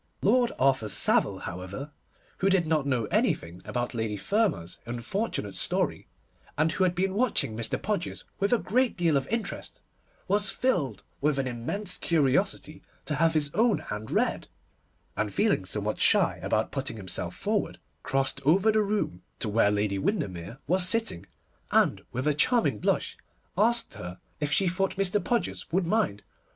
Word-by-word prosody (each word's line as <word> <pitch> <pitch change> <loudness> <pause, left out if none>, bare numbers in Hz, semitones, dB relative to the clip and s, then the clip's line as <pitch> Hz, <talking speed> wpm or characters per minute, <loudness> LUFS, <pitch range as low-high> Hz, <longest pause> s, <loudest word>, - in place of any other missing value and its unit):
Lord 240 +3 +3
Arthur 130 -5 +2
Savile, - - +2
however, 95 +11 -6 0.5
who 195 - +2
did 190 -3 +3
not 155 -3 +1
know 125 -5 +1
anything 85 +2 0
about 120 +4 -2
Lady 110 -3 -2
Fermor's 195 - 0
unfortunate 120 - -3
story, - - +2 0.5
and 155 +2 +2
who 190 - 0
had 180 -1 0
been 190 +1 0
watching 210 - +1
Mr. 110 -1 +1
Podgers 200 -4 -3 0.2
with 200 +1 +1
a 245 - +5
great 245 +3 +1
deal 170 -4 +2
of 135 -1 0
interest, 220 -2 -4 0.4
was 205 +1 +2
filled 170 - 0 0.2
with 150 0 +2
an 135 - 0
immense 130 - -4
curiosity 155 +1 0 0.2
to 150 - -1
have 160 +2 +2
his 145 -2 +3
own 225 0 +3
hand 105 +1 -6
read, - - 0 0.7
and - - -1
feeling - - +1
somewhat - - -3
shy - - +3
about - - 0
putting - - -4
himself - - -3
forward, - - -1 0.2
crossed 135 0 -1
over 190 +9 +4
the 215 0 +3
room 200 - -1 0.2
to - - -1
where 105 -1 +3
Lady 105 -1 0
Windermere 95 - -2
was 180 +1 +2
sitting, 220 - +1 0.4
and, - - +3
with 130 +3 -3
a 150 - +3
charming 235 - +2
blush, - - -1 0.4
asked 235 +2 +2
her 90 +1 -8 0.2
if 150 -1 -2
she 180 +7 +3
thought 195 +2 0
Mr. 195 +1 +2
Podgers 240 -7 -2
would 180 +2 +1
mind. 175 - 0
155 Hz, 160 wpm, -27 LUFS, -, 0.7 s, a